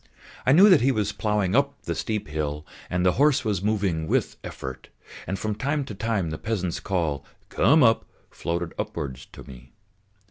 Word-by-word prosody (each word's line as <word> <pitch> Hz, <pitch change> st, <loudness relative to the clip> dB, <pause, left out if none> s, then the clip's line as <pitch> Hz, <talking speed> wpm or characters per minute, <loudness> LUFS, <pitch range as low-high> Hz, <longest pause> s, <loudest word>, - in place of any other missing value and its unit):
I -, -, +6 dB
knew 185 Hz, +9 st, +8 dB
that 180 Hz, -7 st, +6 dB
he 135 Hz, +3 st, +3 dB
was 105 Hz, -4 st, 0 dB
ploughing 105 Hz, -2 st, 0 dB
up 140 Hz, +1 st, +1 dB
the -, -, -2 dB
steep 110 Hz, -7 st, -3 dB
hill 75 Hz, 0 st, -3 dB, 0.2 s
and 90 Hz, 0 st, 0 dB
the 90 Hz, -, +5 dB
horse 145 Hz, -4 st, +4 dB
was 100 Hz, -4 st, 0 dB
moving 100 Hz, -6 st, 0 dB
with -, -, 0 dB
effort, 65 Hz, -1 st, -7 dB, 0.4 s
and 95 Hz, -, -2 dB
from 110 Hz, +2 st, -2 dB
time 140 Hz, +5 st, -1 dB
to 110 Hz, -, -7 dB
time 100 Hz, -5 st, -1 dB
the 80 Hz, -, -5 dB
peasant's 95 Hz, -6 st, -2 dB
call 80 Hz, -8 st, -1 dB, 0.3 s
"come 155 Hz, 0 st, +4 dB
up!" 115 Hz, -1 st, +4 dB, 0.3 s
floated 85 Hz, 0 st, -3 dB
upwards 65 Hz, -2 st, -5 dB
to -, -, -12 dB
me. 65 Hz, -1 st, -14 dB
100 Hz, 180 wpm, -25 LUFS, 80-115 Hz, 0.4 s, knew